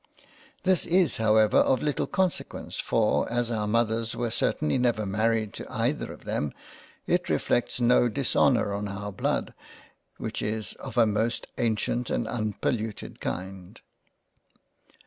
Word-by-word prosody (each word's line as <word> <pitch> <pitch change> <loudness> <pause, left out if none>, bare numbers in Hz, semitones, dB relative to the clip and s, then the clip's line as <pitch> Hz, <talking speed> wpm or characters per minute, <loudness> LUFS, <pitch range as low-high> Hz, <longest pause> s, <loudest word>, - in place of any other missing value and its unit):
This 185 -2 +2
is 175 -3 +3
however 110 -1 +4
of 130 - +3
little 150 -2 0
consequence 190 -3 -2
for - - +1
as 120 0 0
our 105 -2 -1
Mothers 115 0 +1
were 120 -2 -2
certainly 75 - +1
never 120 -4 +1
married 110 +1 0
to - - -8
either - - -1
of - - -12
them 75 -2 -2 0.5
it - - 0
reflects 120 - 0
no 120 0 +4
Dishonour 125 -3 +2
on 100 +1 -2
our 100 +1 -5
Blood, - - -1 0.6
which - - -4
is 110 0 -2
of 130 -3 -8
a 115 - +7
most 110 +2 0
ancient 115 +1 0
and 120 - 0
unpolluted 110 -1 -3
kind. 95 -1 -5
115 Hz, 135 wpm, -27 LUFS, 105-120 Hz, 0.6 s, a